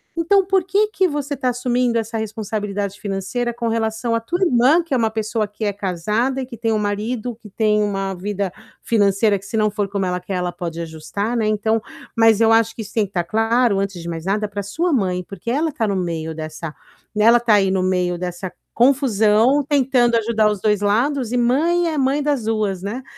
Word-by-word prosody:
Então, 375 +4 +3
por 380 -2 +2
que 410 +3 +1
que 380 -3 +2
você 290 -2 -3
tá 255 - -1
assumindo 245 -1 0
essa 225 0 -2
responsabilidade 205 -2 -4
financeira 210 +5 -2
com 235 0 -4
relação 225 +1 -1
à 230 - +2
tua 345 +12 -3
irmã, 280 +3 +4
que 325 -5 -5
é - - +3
uma 225 -2 +2
pessoa 220 0 -2
que 210 +1 -6
é 205 - 0
casada 210 +7 -1
e 260 - -3
que 245 -2 -9
tem 225 0 -1
um 215 - +2
marido, 215 +3 -2
que 215 -2 -14
tem 210 +1 +1
uma 195 -2 -1
vida 195 0 -3 0.3
financeira 205 -1 +2
que, 195 - -15
se 220 - -3
não 215 -1 +2
for 205 -2 -2
como 195 -1 -1
ela 180 0 -1
quer, 185 +1 -5
ela 180 -1 -1
pode 170 -2 -6
ajustar, 170 +8 -4
né, 220 -2 +1
então 215 +1 +1 0.3
mas 225 -1 +5
eu 225 0 +5
acho 225 0 +3
que 225 - -5
isso 205 - -12
tem 220 -3 +2
que - - -12
estar 175 -3 -1
claro 225 +1 +2
antes 195 -3 -3
de 170 - -8
mais 165 -1 -5
nada 210 +2 0
pra 205 0 -5
sua 325 - -1
mãe, 180 -6 0
porque 200 +4 -7
ela 305 +5 0
tá 225 -5 -1
no 200 - 0
meio 165 -3 -3
dessa 155 0 -6 0.4
e 210 - +2
ela 235 +1 +6
tá 230 -3 +3
aí 195 -2 +3
no 190 -1 +1
meio 180 -1 0
dessa 180 +1 -5 0.2
confusão, 245 0 +3
tentando 255 -4 +3
ajudar 220 -1 +2
os 210 -2 -2
2 210 0 +1
lados 240 +4 +1
e 250 - 0
mãe 330 +8 +2
é 310 - -3
mãe 275 +2 +1
das 285 -7 0
2, 210 -4 -1
né. 225 +7 -5
220 Hz, 225 wpm, -20 LUFS, 195-245 Hz, 0.4 s, ela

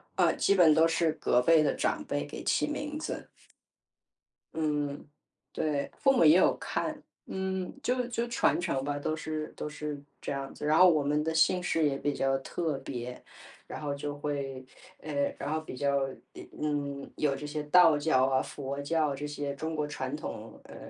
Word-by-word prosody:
呃， - - +4
基 - - +3
本 175 -5 +6
都 160 +1 +5
是， 165 -1 +2
隔 125 - +2
辈 160 +3 +5
的 145 - +2
长 - - -1
辈 - - -2
给 - - -8
起 - - +1
名 295 0 -4
字。 320 - -5 1.2
嗯， 150 -2 -2 0.5
对。 150 -3 -1
父 270 - +4
母 245 - +4
也 155 +2 +8
有 185 - +4
看。 - - -3 0.3
嗯， 190 -1 -2
就 250 0 +1
就 235 0 -2
传 235 - +2
承 135 -6 -1
吧， 145 +1 -2
都 155 +2 -1
是 155 -1 -4
都 150 - -4
是 150 -1 -5 0.2
这 - - -5
样 135 0 -5
子。 - - -7
然 155 +2 +3
后 185 +1 +8
我 155 -4 +3
们 150 +1 +1
的 160 +1 -1
姓 160 +3 +3
氏 165 -3 +2
也 140 - 0
比 145 +1 -1
较 135 -1 +1
特 155 +1 -2
别， 125 -2 -6 0.4
然 - - -6
后 145 -2 -2
就 145 +1 -4
会 140 -3 -4 0.3
呃， 140 -2 -2
然 - - -3
后 155 - -1
比 145 -5 -9
较 140 -1 +1 0.4
呃， - - -9 0.2
嗯， 145 -2 -2
有 150 -2 +1
这 145 +2 -6
些 150 0 -3
道 160 0 +6
教 145 -4 +3
啊， 130 0 +2
佛 140 0 -5
教， 150 -1 0
这 145 +2 -5
些 145 -1 -4
中 160 +2 -4
国 150 -1 -1
传 135 -3 -4
统， 110 -7 -7
呃， - - -12
150 Hz, 205 characters per minute, -30 LUFS, 140-160 Hz, 1.2 s, 也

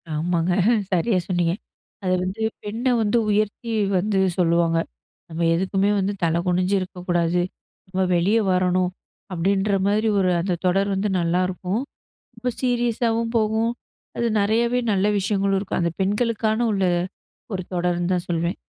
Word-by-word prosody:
ஆமாங்க. 170 +3 0 0.4
சரியா 185 +3 +2
சொன்னீங்க. 175 -2 +1 0.5
அத 185 - 0
வந்து 190 +4 -4 0.2
பெண்ண 220 +4 -5 0.2
வந்து 215 +2 +2
உயர்த்தி 215 +3 0 0.3
வந்து 200 +2 +1 0.2
சொல்லுவாங்க. 170 -1 +2 0.5
"நம்ம 165 +1 -5
எதுக்குமே 190 +3 +1
வந்து 195 +1 0
தலை 165 0 +2
குனிஞ்சு 180 +2 +2
இருக்கக்கூடாது. 175 -2 -1 0.5
நம்ம 185 0 -1
வெளிய 190 +6 +3
வரணும்" 180 0 +2 0.4
அப்பிடின்ற 195 +3 +1
மாதிரி 215 +2 +2
ஒரு 185 -1 +2
அந்த 180 0 -1
தொடர் 195 +2 +2
வந்து 200 +2 0
நல்லாருக்கும். 180 +4 0 0.6
ரொம்ப 250 +3 -2
சீரியஸாவும் 235 -2 0
போகும். 220 +1 +1 0.5
அது 235 - 0
நெறையாவே 235 +4 +2
நல்ல 195 0 +2
விஷயங்களும் 195 0 +1
இருக்கும். 190 -1 -2
அந்த 170 -1 0
பெண்களுக்கான 215 +2 +1
உள்ள, 195 -2 +1 0.7
ஒரு 185 -1 -2
தொடருன்னு 175 0 0
தான் 180 0 -2
சொல்வேன். 170 +2 -1
190 Hz, 130 wpm, -23 LUFS, 180-215 Hz, 0.7 s, வெளிய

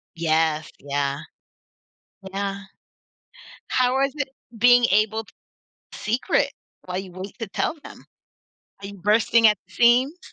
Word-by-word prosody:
Yes, 160 -1 +1
yeah. 140 0 -2 1.1
Yeah. 200 0 -3 1.1
How 250 0 +2
was 275 +1 +1
it 285 -2 -2 0.3
being 245 +1 +6
able 215 +2 +2
t - - -21 0.6
secret 230 +4 0 0.3
while 180 0 -4
you 190 -1 -6
wait 185 +2 -9
to 225 - -4
tell 200 - -2
them? - - -12 0.8
Are 200 - -7
you 200 - -9
bursting 215 +4 +3
at 210 -2 +4
the - - -22
seams? 250 +7 +3
210 Hz, 130 wpm, -23 LUFS, 180-240 Hz, 1.1 s, being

